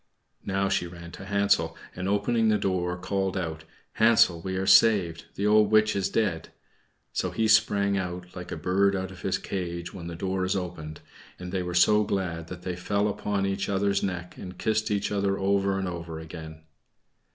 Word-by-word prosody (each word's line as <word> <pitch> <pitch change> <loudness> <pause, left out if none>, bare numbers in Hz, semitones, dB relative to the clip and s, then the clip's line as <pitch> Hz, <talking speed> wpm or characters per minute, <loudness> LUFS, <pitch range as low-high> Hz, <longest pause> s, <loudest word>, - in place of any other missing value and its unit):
Now 95 0 +1
she 95 -2 0
ran 85 -1 -10
to 95 - -9
Hansel, 100 -4 +1 0.2
and, 95 +1 -3
opening 110 +3 +2
his 105 - +2
door, 90 -2 -1
called 95 +1 -2
out, 80 -3 -4 0.3
"Hansel 110 -7 +4
we 95 +2 -4
are 95 - -1
saved; 95 -5 +4
the 100 - -2
old 105 0 +5
witch 110 0 +4
is 100 -1 0
dead!" 95 -7 -1 0.6
So - - -1
he 110 - 0
sprang 100 -2 +3
out, 90 -1 -6
like 90 0 -8
a - - -3
bird 100 +2 +2
out 95 0 -3
of - - -12
his - - 0
cage 85 -2 -5
when 85 -3 -7
the 85 - -6
door 95 +2 -2
is 95 +2 0
opened; 85 -5 -5 0.4
and 90 0 -7
they 95 -1 -1
were 90 -1 -4
so 105 +4 +5
glad 90 -5 -2
that 90 0 -9
they 90 -1 -3
fell 100 +3 0
upon 100 -1 -1
each 100 0 -2
other's 100 0 +1
neck, 90 -2 -4
and 90 0 -9
kissed 110 0 0
each 105 -1 -1
other 100 -1 0
over 100 0 +1
and 95 -1 -2
over 85 -2 -6
again. 80 -1 -9
95 Hz, 195 wpm, -27 LUFS, 90-100 Hz, 0.6 s, old